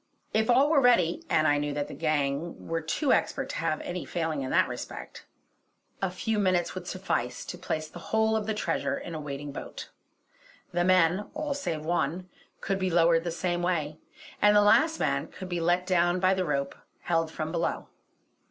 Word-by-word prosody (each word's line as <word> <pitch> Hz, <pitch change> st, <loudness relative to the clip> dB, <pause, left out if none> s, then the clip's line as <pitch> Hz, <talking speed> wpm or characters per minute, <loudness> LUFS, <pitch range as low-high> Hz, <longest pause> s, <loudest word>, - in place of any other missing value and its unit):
If 220 Hz, +1 st, +2 dB
all 270 Hz, +5 st, +5 dB
were 290 Hz, -4 st, +5 dB
ready 185 Hz, -10 st, +3 dB
and 155 Hz, 0 st, +3 dB
I 145 Hz, -1 st, +3 dB
knew 145 Hz, 0 st, -2 dB
that 145 Hz, 0 st, -2 dB
the -, -, -8 dB
gang 155 Hz, 0 st, -1 dB
were 165 Hz, 0 st, -1 dB
too 255 Hz, -, +1 dB
expert -, -, 0 dB
to -, -, -4 dB
have 155 Hz, -, -1 dB
any 180 Hz, 0 st, -4 dB
failing 160 Hz, -4 st, -2 dB
in 130 Hz, -, -3 dB
that -, -, +3 dB
respect -, -, -8 dB, 0.7 s
a 195 Hz, -, +1 dB
few 210 Hz, +4 st, -2 dB
minutes 185 Hz, -3 st, +1 dB
would 185 Hz, -1 st, -7 dB
suffice 125 Hz, -10 st, -2 dB
to -, -, -6 dB
place 155 Hz, 0 st, -3 dB
the 175 Hz, -, -11 dB
whole 220 Hz, 0 st, +2 dB
of 215 Hz, -1 st, -1 dB
the 220 Hz, -, -1 dB
treasure 210 Hz, -, -1 dB
in 170 Hz, -, -7 dB
a 155 Hz, -, -4 dB
waiting 145 Hz, 0 st, -6 dB
boat. -, -, -8 dB, 0.8 s
The 175 Hz, 0 st, +1 dB
men, 185 Hz, +2 st, +3 dB
all 300 Hz, -1 st, -2 dB
save 170 Hz, -, -3 dB
one, 175 Hz, +2 st, -1 dB, 0.3 s
could 195 Hz, 0 st, -1 dB
be 185 Hz, -1 st, 0 dB
lowered 165 Hz, -1 st, +4 dB
the 175 Hz, -, -2 dB
same 175 Hz, +1 st, -1 dB
way, 155 Hz, -4 st, -1 dB, 0.4 s
and 210 Hz, 0 st, +6 dB
the 205 Hz, -, +7 dB
last 315 Hz, +10 st, +4 dB
man -, -, 0 dB
could 185 Hz, -1 st, -9 dB
be 175 Hz, -1 st, -2 dB
let 175 Hz, +2 st, +2 dB
down 175 Hz, -1 st, +2 dB
by 185 Hz, +1 st, +4 dB
the 185 Hz, -1 st, 0 dB
rope 140 Hz, -3 st, -1 dB, 0.3 s
held 165 Hz, -2 st, 0 dB
from 155 Hz, 0 st, -4 dB
below. 170 Hz, -1 st, -2 dB
175 Hz, 200 wpm, -28 LUFS, 155-190 Hz, 0.8 s, the